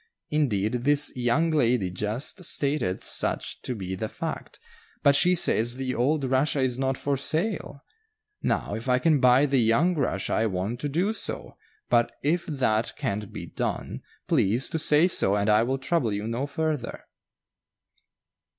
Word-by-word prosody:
Indeed, 120 -6 0
this 145 +1 +2
young 130 +7 +1
lady 120 -10 +1
just 110 - -2
stated 140 - -1
such - - -1
to 125 - -4
be 95 -3 -5
the 110 +3 -4
fact, - - -6 0.4
but 140 -1 +5
she 180 +5 +5
says 120 -7 +3
the 130 -1 -3
old 140 +5 +1
Russia 135 +3 +1
is 130 -1 0
not 135 0 0
for 140 0 -1
sale. 155 - -2 0.6
Now, - - -1
if 115 +4 -4
I 125 - +4
can 150 +2 +2
buy 125 +2 +5
the 135 -2 +1
young 120 +11 +3
Russia 145 -6 -1
I 110 - +2
want 100 +4 -3
to 145 - -3
do 180 +9 0
so - - -6 0.3
but 120 -1 +2
if 170 +5 0
that 120 -7 0
can't 105 -7 -3
be - - -7
done, - - -4 0.3
please 115 +7 +2
to 160 - -1
say 150 +2 +4
so 100 - +2
and 100 0 0
I 105 +1 +5
will 130 +3 0
trouble 135 -3 0
you 105 +1 -3
no 120 +5 -2
further." 155 -4 -3
130 Hz, 165 wpm, -26 LUFS, 115-150 Hz, 0.6 s, but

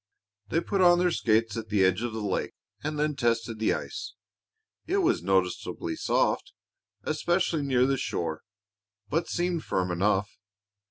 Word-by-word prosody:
They 165 - +1
put 195 +1 -1
on 175 -1 +7
their 180 0 +2
skates 110 -5 +1
at 110 -2 -5
the 100 -2 +3
edge 95 +3 +2
of 120 -1 -2
the 110 -1 -4
lake 100 -2 -2 0.3
and 155 0 -2
then 150 0 0
tested 115 -3 0
the 110 - +2
ice. - - -6 0.7
It 390 - +1
was 360 -2 +2
noticeably 95 -2 -1
soft, - - 0 0.5
especially 165 0 0
near 130 -3 +3
the 135 0 +1
shore, 80 -9 -3 0.7
but 165 +4 0
seemed 175 -2 -1
firm 90 -1 -1
enough. 100 +3 0
120 Hz, 155 wpm, -28 LUFS, 105-165 Hz, 0.7 s, on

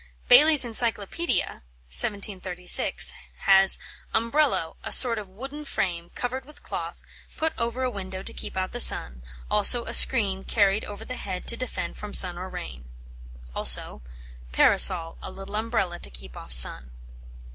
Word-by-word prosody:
Bailey's 290 +2 +6
Encyclopædia 230 - 0 0.3
(1736) 185 - +1 0.3
has 195 0 +6 0.4
"Umbrello, 230 - -1
a - - -8
sort 235 -4 +4
of 205 - -11
wooden 270 +10 -10
frame, 175 -10 -5
covered 255 +2 -6
with 300 +2 -18
cloth, - - -8 0.3
put 320 0 -3
over 235 +2 -4
a 255 - -2
window 190 -2 -9
to - - -7
keep - - -8
out 185 0 -4
the 240 - -8
sun; 65 - +5 0.3
also 235 +3 +4
a - - -8
screen 195 -7 +3
carried 200 -1 -1
over 205 +2 -11
the 255 +1 -9
head 185 -2 -8
to 235 - +1
defend 255 0 -7
from 210 -1 -6
sun 180 -2 +3
or 185 +2 -9
rain." 65 - -10 0.7
Also - - 0 0.5
"Parasol, 165 - +3
a - - -9
little 195 +2 -11
umbrella 215 -5 -4
to - - -5
keep - - -11
off - - -12
sun." 60 +1 +3
200 Hz, 150 wpm, -23 LUFS, 180-240 Hz, 0.7 s, Bailey's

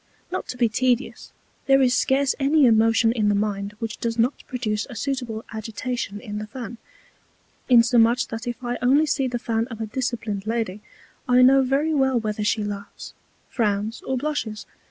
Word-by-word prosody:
Not - - -3
to 250 - -6
be 240 -1 +3
tedious, 245 +3 -1 0.4
there 270 0 +5
is 255 -2 +3
scarce 270 +1 +2
any 285 +1 +4
Emotion 225 0 +4
in 215 -3 +1
the 205 - +2
Mind 200 0 -2
which 225 -1 -5
does 230 0 -2
not 240 +4 0
produce 215 -5 -2
a 245 - -8
suitable 245 -3 -3
Agitation 220 0 -4
in 210 -3 -6
the 215 - -6
Fan; 235 0 -8 0.9
insomuch, 240 0 +5
that 225 +2 -6
if 240 +1 -5
I 245 0 -3
only 275 +5 +4
see 275 -3 0
the 245 -1 -2
Fan 230 -1 -1
of 225 -4 -9
a 225 - -2
disciplin'd 215 -4 -3
Lady, 220 -3 -2 0.5
I 250 0 +6
know 270 +1 +6
very 275 +5 +1
well 265 -4 +2
whether 215 -1 -3
she 210 +1 +1
laughs, 205 0 -7 0.3
frowns, 215 -1 -1
or 265 - -2
blushes. 245 -7 -3
235 Hz, 175 wpm, -23 LUFS, 215-255 Hz, 0.9 s, I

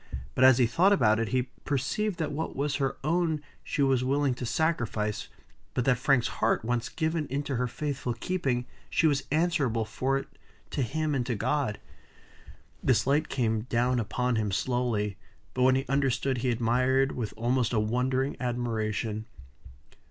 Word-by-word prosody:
But 130 - +2
as 130 -2 +7
he 125 - +5
thought 170 - +4
about 110 - +3
it, 115 - 0
he 130 +2 +1 0.2
perceived 170 - -1
that 160 -3 -2
what 155 +3 -3
was 140 +1 -1
her 135 -2 -1
own 165 0 +1 0.2
she 145 - 0
was 135 -2 +3
willing 140 +1 +1
to 125 0 -5
sacrifice; 115 - -1 0.5
but 125 - 0
that 125 -3 +3
Frank's 135 -2 +3
heart, 110 0 +2
once 120 +1 -1
given 160 -2 -1
into 140 +1 -2
her 125 +1 0
faithful 135 -1 -3
keeping, 130 -3 -1 0.2
she - - +2
was 145 -3 +2
answerable 150 -8 +1
for 130 +5 0
it 135 - -5 0.4
to 145 - -1
him 155 +5 -1
and 130 -3 +1
to 120 - 0
God. 125 0 -1 1.0
This - - +2
light 145 +4 +2
came 110 -3 0
down 125 +1 +2
upon 125 +2 0
him 105 -2 0
slowly; 110 -2 0 0.4
but 125 - -2
when 130 0 +5
he 135 +1 0
understood, 135 -1 +1
he 125 +1 0
admired 125 +3 +2
with 115 -4 -4
almost 120 +1 +1
a 115 - +2
wondering 130 +5 0
admiration. 110 -3 -2
130 Hz, 165 wpm, -28 LUFS, 120-140 Hz, 1.0 s, as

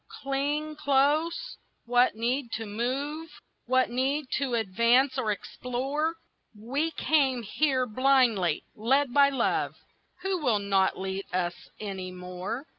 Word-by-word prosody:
cling 290 +3 -1
close, 300 +3 +1 0.3
what 245 0 +3
need 240 +2 -1
to 225 - -3
move, 275 +9 -3 0.4
What 255 -1 +2
need 270 +4 0
to 265 -4 -1
advance 235 +5 +3
or 215 - 0
explore? 270 +9 -2 0.4
We 275 +9 -1
came 275 -6 +1
here 260 +3 +1
blindly, 240 - +2
led 260 +4 +1
by 280 -1 +6
love, 265 -4 0 0.5
Who 380 -1 0
will 245 -7 +2
not 195 -2 +1
lead 190 +1 -4
us 180 -1 0 0.3
any 195 -3 -5
more. 180 +8 -6
255 Hz, 120 wpm, -28 LUFS, 215-285 Hz, 0.5 s, by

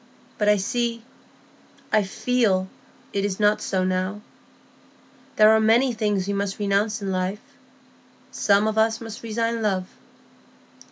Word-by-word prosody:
But 210 -1 +3
I 210 - +5 1.4
see—I 215 - +5
feel 210 -2 0 0.5
it 200 - -1
is 200 -1 -2
not 210 0 +3
so 190 -2 -1
now; 185 +2 -2 1.1
there 215 0 +6
are 225 +4 +4
things 210 -4 -1
we 200 - -2
must 200 -1 -2
renounce 205 +1 0
in 195 - -2
life; 185 +3 -4 0.8
some 205 +1 +2
of 220 0 0
us 225 0 +2
must 225 -2 -8
resign 230 0 -2
love. 190 -4 0
210 Hz, 125 wpm, -23 LUFS, 195-220 Hz, 1.4 s, there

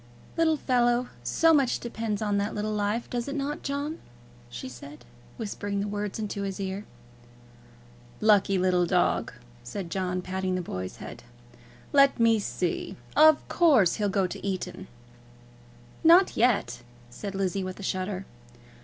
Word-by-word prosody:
"Little 320 -2 +3
fellow! 245 -2 +2
So 325 - +4
much 275 -5 +2
depends 225 -3 -3
on 205 -1 +1
that 205 +1 -2
little 215 +1 -2
life, 210 +3 -1
does 240 0 -3
it 280 - -4
not, 290 +1 -3
John?" 285 +3 -3 0.5
she 120 - -7
said, 130 +2 -11 0.3
whispering 205 -2 -3
the 200 - -1
words 205 -1 -3
into 210 -2 -4
his 195 -1 -4
ear. 195 +1 -4 1.3
"Lucky 205 -2 +4
little 180 -1 +2
dog!" 180 0 +1 0.3
said 170 +8 -6
John, 180 -1 -2
patting 185 0 -2
the 185 - -1
boy's 95 - -5
head. - - -9 0.7
"Let 275 -2 +5
me 230 -1 +4
see! 180 -3 -3 0.2
of 310 0 +6
course 275 - +4
he'll 205 -1 0
go 195 -1 +1
to 180 - -6
Eton." 190 -1 -4 1.2
"Not 345 +4 +6
yet," 220 - +1 0.3
said 195 - -6
Lizzie 195 0 -1
with 185 +1 -6
a - - -7
shudder. 190 +1 -3
205 Hz, 145 wpm, -27 LUFS, 185-240 Hz, 1.3 s, of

